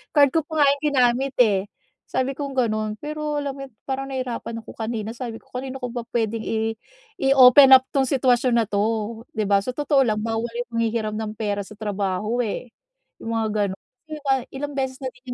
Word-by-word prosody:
Card 285 -2 +6
ko 325 - +3
pa 315 -2 +2
nga - - +6
'yong 285 +1 -3
ginamit, 255 +1 +2
eh, 200 -4 +2 0.5
sabi 260 +1 -1
kong 280 -2 -4
gano'n. 215 -3 0
Pero 300 0 -3
alam 280 - -2
mo 275 - -9
yun, - - -25
parang 270 0 -3
nahirapan 245 -3 -4
ako - - -11
kanina, 220 -1 -4
sabi 235 -2 -6
ko, - - -30
"Kanino 260 +1 -5
ko 250 -2 -5
ba 240 -2 -5
puwedeng 225 -1 -1
i 220 0 -1 0.5
i-open-up 265 -1 +8
'tong 270 -1 +2
sitwasyon 250 -3 +3
na - - -5
'to?" 215 +2 -1
'di 215 - 0
ba. 200 0 +4
Sa 250 +5 -5
totoo 290 -2 +2
lang 215 -1 0
bawal 225 +1 -1
'yong 240 +1 -5
nanghihiram 220 -2 -1
ng 215 -1 -4
pera 205 -2 -1
sa 200 +2 -11
trabaho, 205 +1 -2
eh. 230 +1 -4 0.5
'Yong - - -8
mga 225 -1 0 0.2
gano'n. 190 - -8 0.7
Ilang 290 +2 -4
beses 265 -1 -2
na 260 - -3
din 255 - -23
240 Hz, 195 wpm, -23 LUFS, 220-265 Hz, 0.7 s, i-open-up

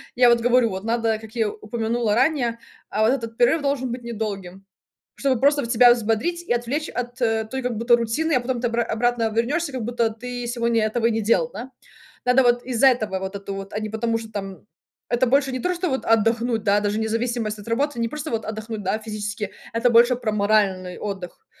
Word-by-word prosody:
Я 245 0 +6
вот 235 0 +4
говорю 245 0 +3
вот 190 +2 -5
надо, 225 -1 0
как 220 +1 -13
я 220 -2 +1
у - - -9
упомянула 225 0 -1
ранее, 240 -4 +1 0.3
а 215 - -1
вот 225 - +4
этот 230 -4 -3
перерыв 285 +6 +3
должен 275 -3 -1
быть 245 +1 -5
недолгим, 200 -5 -5 0.5
чтобы 270 -3 +1
просто 285 +1 +4
вот 235 - -3
себя 240 +1 +7
взбодрить 235 +10 -1
и 290 - 0
отвлечь 250 +7 -2
от, 245 +1 -5
э, 225 -1 +1
той 265 +4 -4
как 250 -2 -2
будто 235 +1 +4
рутины, 235 +8 -1
а 255 - +4
потом 245 0 -2
ты 240 - +1
обра 235 0 0
обратно 230 0 0
вернешься, 285 +6 0
как 250 -4 -3
будто 235 -1 0
ты 245 +2 -6
сегодня 235 -2 +1
этого 230 +1 +1
не 225 -1 0
делал, 185 -7 +2
да. 240 +6 -7 0.5
Надо 250 +1 +5
вот 240 0 +3
из-за 255 +1 +3
этого 215 -7 +1
вот 190 +1 -5
это 200 0 -6
вот, 195 +1 -7
а 210 - -2
не 215 - -4
потому 225 +1 -1
что 220 -1 -10
там 195 -3 -6 0.4
это 245 +2 +2
больше 270 +1 +2
не 255 - -3
то, 360 +5 0
что 355 0 -1
вот 265 -1 -2
отдохнуть, 225 0 +2
да, 205 -1 +3
даже 205 +1 -1
независимость 225 -1 -2
от 205 - -12
работы 275 +2 0
не 230 - +1
просто 300 0 -5
вот 225 -1 -2
отдохнуть, 220 0 -5
да, 195 +3 0
физически. 210 -1 -5 0.2
Это 230 +2 +2
больше 240 +2 +6
про 235 -3 -2
моральный 200 -3 +1
отдых. 200 - -6
230 Hz, 220 wpm, -23 LUFS, 215-245 Hz, 0.5 s, себя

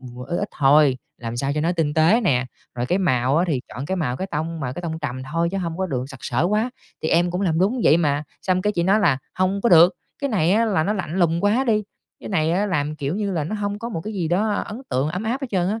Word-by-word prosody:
ừm, 125 -1 -11
ít 175 - -2
ít 205 - -2
thôi, 140 -1 +5 0.2
làm 115 0 -5
sao 135 +3 -1
cho 150 - 0
nó 165 +3 +1
tinh 160 -4 -1
tế 165 +9 +4
nè. 130 - +1 0.3
Rồi 120 0 -2
cái 180 +7 +1
màu 130 -6 +2
á 170 - +3
thì 140 -5 0
chọn 135 +3 -6
cái 190 - -1
màu 130 -8 -1
cái 190 - -3
tông 160 +2 -3
mà 125 -3 -3
cái 175 - -7
tông 160 -2 -3
trầm 130 -4 -4
thôi 170 +1 +1
chứ 195 - -1
hông 170 -2 -3
có 190 - 0
được 130 -6 -2
sặc 130 - -10
sỡ 125 +4 0
quá, 215 +4 +1 0.3
thì 160 - 0
em 175 +1 +3
cũng 180 +2 -2
làm 165 -4 +1
đúng 220 +7 +1
vậy 155 - +6
mà." 145 -3 +1 0.2
Xong 185 -1 +1
cái 210 - +1
chị 170 - 0
nói 195 +5 +3
là 150 -10 +3 0.2
"Hông 190 +2 0
có 235 - +3
được, 175 +2 +7 0.3
cái 280 -2 -1
này 185 -4 +2
á, 225 +2 +3
là 190 -8 +1
nó 210 - +1
lạnh 180 -5 -4
lùng 170 -1 +2
quá 225 +6 +3
đi, 215 -3 +2 0.4
cái - - -8
này 160 -5 +1
á 200 +4 +1
làm, 150 -5 -1
kiểu 145 +4 -2
như 205 -2 -1
là, 165 -5 -1
nó 170 - -4
hông 205 -1 -3
có 230 - -5
một 170 -9 -4
cái 215 +6 -6
gì 175 -4 -1
đó 205 +5 +1
ấn 215 +4 -4
tượng 130 +4 0
ấm 180 +5 -3
áp 240 +5 -2
hết 270 - -3
trơn 185 -2 +1
á." 220 +2 -2
170 Hz, 295 wpm, -22 LUFS, 150-200 Hz, 0.4 s, được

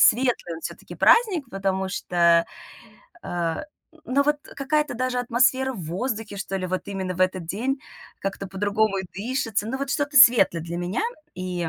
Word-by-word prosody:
светлый 240 -7 +3
он, 160 - -9
всё-таки, - - -8
праздник, 395 - +4
потому 190 -1 -1
что, 170 -2 +3 0.8
а, 170 - -2 0.4
ну, 270 +3 +2
вот 295 +1 +2 0.2
какая-то 295 0 0
даже 255 +1 -1
атмосфера 260 +2 +2
в 205 -8 -7
воздухе, 210 +4 -3
что 195 0 -3
ли, 185 -1 -3
вот 185 0 -2
именно 190 -2 -3
в 180 - -8
этот 185 -2 +1
день, 255 - -2 0.4
как-то 195 0 -4
по-другому 200 +1 0
и 190 - -3
дышится. 225 0 -2
Ну 265 +3 -3
вот 275 0 -3
что-то 290 0 -1
светлое 235 -10 +7
для 170 +1 -5
меня, 180 - -2 0.3
и 180 -2 -3
205 Hz, 165 wpm, -24 LUFS, 185-260 Hz, 0.8 s, светлое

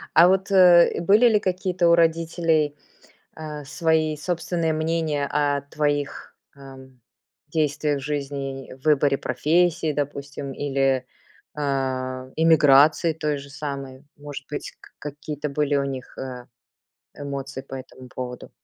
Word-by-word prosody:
А 175 +2 +8
вот, 190 +1 +1
э, 180 -4 +6
были 210 +7 +5
ли 215 -2 +4
какие-то 185 -2 0
у - - +6
родителей, 165 -2 +1 0.6
а, 150 -2 -7
свои 160 0 0
собственные 170 0 -1
мнения 155 -2 -1
о 145 -1 0
твоих, 145 0 -3 0.2
ам, 130 -2 -14 0.5
действиях 150 -2 0
в - - -9
жизни, 140 -2 -4
в 130 - -18
выборе 145 -2 +3
профессии, 160 +4 +1
допустим, 140 -1 -4
или, 135 -2 0 0.5
а 130 -2 -2
эмиграции 155 0 +5
той 150 -2 -2
же 140 0 -11
самой? 140 -2 -6
Может 145 -2 -9
быть, 150 - -5
к - - -17
какие-то 150 0 -6
были 145 0 0
у 140 - +2
них, 135 -2 -6
а, 125 -2 -7 0.7
эмоции 140 -1 -6
по 135 - -10
этому 130 -1 -10
поводу? 125 -1 -6
145 Hz, 130 wpm, -23 LUFS, 135-160 Hz, 0.7 s, А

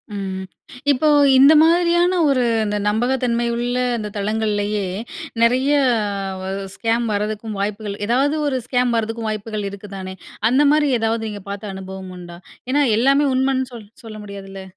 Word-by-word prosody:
ம். 190 -1 -4 0.5
இப்போ, 285 +3 +1 0.3
இந்த 280 +4 +8
மாதிரியான 345 +2 +3
ஒரு 255 -3 +2 0.2
இந்த 210 0 -1
நம்பகத்தன்மை 240 +1 0
உள்ள 245 +1 -2 0.2
அந்த 210 -2 -4
தளங்கள்லேயே 210 -1 -1 0.6
நெறைய 255 +4 +3 0.7
வ 190 - -6 0.3
ஸ்கேம் 230 +2 0
வரதுக்கும் 210 +1 -3
வாய்ப்புகள், 205 0 -3
ஏதாவது 270 +6 +2
ஒரு 260 -2 0
ஸ்கேம் 245 -1 +1
வரதுக்கும் 225 0 -2
வாய்ப்புகள் 215 -1 -4
இருக்குதானே. 195 -1 -8 0.3
அந்த 260 +4 +3
மாரி 300 -1 +3
ஏதாவது 225 0 0
நீங்க 205 -2 -8
பார்த்த 200 0 -6
அனுபவம் 190 -1 -8
உண்டா? 175 -1 -10 0.3
ஏன்னா, 290 +1 +3
எல்லாமே 275 +4 +3
உண்மைன்னு 260 0 0
சொல் 215 -3 -10 0.2
சொல்ல 215 -1 -8
முடியாதுல்ல. 195 -1 -9
225 Hz, 140 wpm, -20 LUFS, 205-260 Hz, 0.7 s, இந்த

